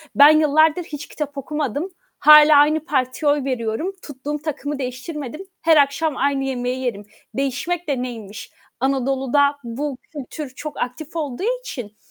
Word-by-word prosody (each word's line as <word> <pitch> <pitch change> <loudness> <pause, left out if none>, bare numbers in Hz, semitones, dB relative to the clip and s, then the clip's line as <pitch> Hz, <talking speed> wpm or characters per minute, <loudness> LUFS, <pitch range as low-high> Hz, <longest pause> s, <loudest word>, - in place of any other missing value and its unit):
Ben 285 +1 +9
yıllardır 310 +3 +3
hiç 295 -2 -8
kitap 290 -2 -6
okumadım, 295 - -3 0.3
hâlâ 300 0 +8
aynı 305 +2 +4
partiye 275 0 +1
oy 290 -2 0
veriyorum, 255 - -2
tuttuğum 290 +1 -6
takımı 290 -2 -4
değiştirmedim, 270 +4 -5 0.2
her 320 -1 +5
akşam 285 +1 +2
aynı 275 -1 +1
yemeği 255 -1 -2
yerim. 205 -4 -3 0.3
Değişmek 305 +6 -2
de 270 -4 -1
neymiş? 220 -4 -7 0.3
Anadolu'da 270 +2 +1
bu 260 +3 -4
kültür 290 0 -7
çok 305 -1 -7
aktif 290 +6 -5
olduğu 335 - -2
için 230 - -8
285 Hz, 140 wpm, -21 LUFS, 255-305 Hz, 0.3 s, Ben